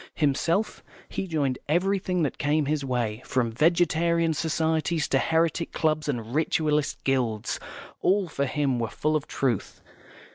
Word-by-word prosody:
Himself, 165 +7 0 0.3
he 190 - -3
joined 140 -6 0
everything 180 +1 +1
that 145 - -2
came 150 +1 +1
his 150 0 -1
way, 120 -4 -1
from 120 -3 0
Vegetarian 170 +3 +2
Societies 160 0 0
to 135 - +3
Heretic 165 +2 +1
Clubs 155 -1 0
and 120 -4 -3
Ritualist 150 -1 0
Guilds; 120 -6 0 0.4
all, 195 0 +2
for 140 -4 -1
him, 135 -3 0
were 115 -2 -1
full 155 +7 -1
of 150 - -1
truth. 125 -7 -2
155 Hz, 140 wpm, -26 LUFS, 135-165 Hz, 0.4 s, to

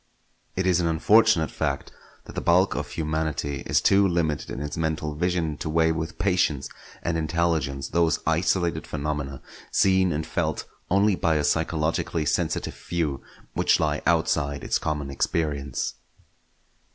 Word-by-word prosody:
It 95 - 0
is 90 -2 +3
an 85 - +1
unfortunate 85 +1 +4
fact - - -2 0.3
that - - -10
the - - -3
bulk 90 +3 +3
of - - -4
humanity 80 -3 -2
is - - +3
too 100 0 +5
limited 85 -4 -1
in - - -5
its 75 0 -4
mental 80 -1 -2
vision 80 -1 -1
to 75 - -4
weigh 80 +1 +3
with 80 0 -4
patience 85 -8 +1 0.3
and 85 -1 0
intelligence 80 -4 0
those 85 -1 +2
isolated 85 +1 +1
phenomena, 70 -2 -4 0.3
seen 95 -2 +3
and 75 0 -2
felt 80 -3 -2 0.2
only 100 +2 +4
by 80 -2 +1
a 75 - +1
psychologically 80 +1 0
sensitive 75 - -1
few, 80 -6 -3 0.3
which - - +3
lie - - 0
outside 70 0 +1
its - - 0
common 75 -3 -3
experience. 70 -1 -1
80 Hz, 145 wpm, -25 LUFS, 75-85 Hz, 0.3 s, too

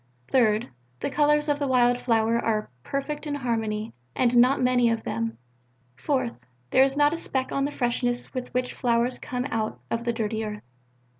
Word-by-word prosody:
Third: 225 -3 +3 0.3
the - - -2
colours 295 +1 +3
of 290 -1 +1
the 285 - 0
wild 245 -1 +3
flower 230 -1 +2
are 215 - -1
perfect 290 - -4
in 290 - -2
harmony, 225 -5 -2 0.2
and 245 -1 +2
not 250 +3 +5
many 250 -1 +3
of 230 -1 -1
them. 115 0 -3 0.6
Fourth: 255 - -1 0.4
there - - +5
is 270 +1 +1
not 290 +1 +4
a 330 - -3
speck 265 -5 -2
on 275 0 0
the 290 - -2
freshness 245 -1 -1
with 255 -2 -5
which 250 0 -1
flowers 240 0 +1
come 250 0 -3
out 220 -1 -2
of 230 0 -1
the 240 - 0
dirty 220 -1 -2
earth. 210 -1 -6
245 Hz, 180 wpm, -26 LUFS, 225-270 Hz, 0.6 s, not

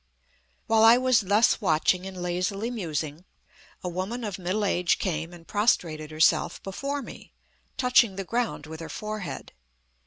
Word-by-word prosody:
While 220 0 +4
I 230 +2 +8
was 255 -2 +3
thus 205 +4 +3
watching 180 +1 +2
and 185 -2 -7
lazily 185 +6 -2
musing, 160 -7 -4 0.6
a - - -3
woman 190 +8 -3
of 205 -3 -4
middle 190 +4 -1
age 180 -3 +2
came 165 -3 -2
and 170 -1 -13
prostrated 165 -8 +1
herself 155 0 +2
before 275 +9 -4
me, - - -12 0.4
touching 250 -5 +4
the 195 - -3
ground 230 -5 -2
with 160 0 -8
her 165 -1 -7
forehead. 215 -1 -6
190 Hz, 150 wpm, -26 LUFS, 170-225 Hz, 0.6 s, I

